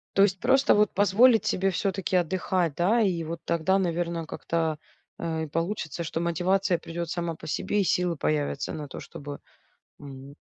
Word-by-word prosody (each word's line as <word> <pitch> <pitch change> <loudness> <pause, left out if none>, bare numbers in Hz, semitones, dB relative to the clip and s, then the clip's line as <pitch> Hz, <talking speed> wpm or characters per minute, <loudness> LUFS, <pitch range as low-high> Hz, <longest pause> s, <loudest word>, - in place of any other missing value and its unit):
То 195 - +5
есть 190 -2 +2
просто 265 +5 +4
вот 210 -1 +3
позволить 215 +3 +5
себе 195 +1 +1
все-таки 190 +1 -1
отдыхать, 180 -1 +1
да, 205 +9 +3
и 185 -5 +1
вот 165 +1 -5
тогда, 170 +3 +1
наверно, 170 -2 -1
как-то, 160 -1 -2 0.4
э, 160 -1 -2
и - - -4
получится, 165 0 -3
что 165 +1 -3
мотивация 180 +2 +1
придет 170 0 -5
сама 170 -1 -2
по - - -11
себе 205 +6 0
и - - +2
силы 180 -1 +1
появятся 145 -2 -1
на 150 -2 -6
то, - - -8
чтобы, 145 0 -8 0.6
мм 135 -1 -10
170 Hz, 170 wpm, -27 LUFS, 160-195 Hz, 0.6 s, То